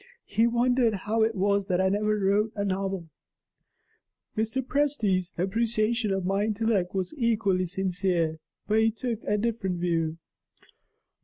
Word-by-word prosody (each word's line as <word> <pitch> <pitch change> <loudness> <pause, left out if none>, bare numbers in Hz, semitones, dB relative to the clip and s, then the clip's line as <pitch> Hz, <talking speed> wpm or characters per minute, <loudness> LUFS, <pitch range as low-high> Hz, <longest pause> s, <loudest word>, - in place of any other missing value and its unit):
He 225 +3 +2
wondered 240 -1 +2
how 220 +2 +1
it 225 0 +2
was 200 0 +1
that 180 -2 +1
I 190 0 +3
never 210 +2 +1
wrote 205 +2 +2
a 200 -1 -1
novel. 190 -2 -2 1.3
Mr. 225 +4 -1
Presty's 225 -11 +1
appreciation 220 +3 +1
of 195 -1 -1
my 195 +2 +1
intellect 210 -4 0
was 185 -2 -2
equally 210 -6 +1
sincere; 180 -3 0 0.3
but 215 +1 +3
he 225 0 +4
took 230 0 -4
a 210 - +1
different 205 -5 -1
view. 165 -2 0
205 Hz, 140 wpm, -27 LUFS, 190-225 Hz, 1.3 s, he